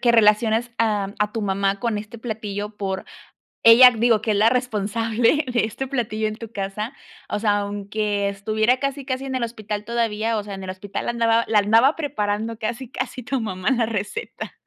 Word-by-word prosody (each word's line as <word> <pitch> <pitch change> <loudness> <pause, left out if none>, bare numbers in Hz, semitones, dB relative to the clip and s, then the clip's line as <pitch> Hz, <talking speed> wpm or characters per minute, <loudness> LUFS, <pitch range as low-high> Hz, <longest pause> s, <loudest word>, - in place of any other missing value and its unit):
que 240 - +4
relaciones 225 +1 +3
a 205 -3 0
a 210 0 +1
tu 225 - -3
mamá 195 0 0
con 230 -1 -1
este 215 +3 -7
platillo, 210 -3 -4
por 190 -2 -3 0.6
ella, 240 +2 +10
digo, 230 -1 +2
que 220 - 0
es 205 - +1
la 220 +2 +5
responsable 230 +2 +1
de 240 - +2
este 260 +5 -5
platillo 220 -5 -1
en 215 - -4
tu 230 0 -9
casa, 205 +4 -4 0.4
o 210 - -1
sea, 205 -1 +2
aunque 205 0 -2
estuviera 220 +5 +1
casi, 275 0 -2
casi 260 0 -3
en 265 - -4
el 255 -2 -1
hospital 215 -3 -4
todavía 225 -1 0
o 210 - -2
sea, 200 -1 -7
en 195 - -8
el 185 - -6
hospital 190 +2 -6
andaba 230 -1 +2
la 215 -2 +4
andaba 225 +8 +4
preparando, 225 -6 -2
casi, 235 +3 -4
casi 250 - -4
tu 265 +3 -1
mamá, 190 -1 -2
la 240 -3 +2
receta. 220 - -5
220 Hz, 190 wpm, -22 LUFS, 205-235 Hz, 0.6 s, ella